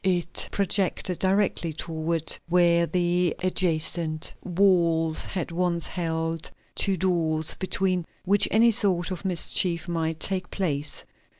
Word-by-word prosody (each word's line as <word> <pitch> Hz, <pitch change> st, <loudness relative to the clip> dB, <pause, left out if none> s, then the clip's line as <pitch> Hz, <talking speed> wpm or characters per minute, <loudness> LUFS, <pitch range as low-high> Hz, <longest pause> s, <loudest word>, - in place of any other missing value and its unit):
It 180 Hz, -3 st, +1 dB
projected 190 Hz, -2 st, -1 dB
directly 190 Hz, -4 st, 0 dB
toward 160 Hz, 0 st, +2 dB
where 170 Hz, -1 st, +3 dB
the 175 Hz, -1 st, 0 dB
adjacent 165 Hz, -3 st, +1 dB
walls 170 Hz, -4 st, +1 dB
had 180 Hz, -3 st, -5 dB
once 170 Hz, -1 st, -1 dB
held 165 Hz, -2 st, -3 dB, 0.2 s
two 195 Hz, -1 st, 0 dB
doors, 160 Hz, -3 st, +1 dB
between 185 Hz, -2 st, -2 dB, 0.2 s
which 200 Hz, +2 st, +4 dB
any 230 Hz, +2 st, +4 dB
sort 190 Hz, -4 st, +1 dB
of 185 Hz, +1 st, -6 dB
mischief 175 Hz, -1 st, 0 dB
might 165 Hz, -2 st, -3 dB
take 185 Hz, -2 st, -3 dB
place. 150 Hz, -6 st, -3 dB
175 Hz, 115 wpm, -25 LUFS, 165-185 Hz, 0.2 s, which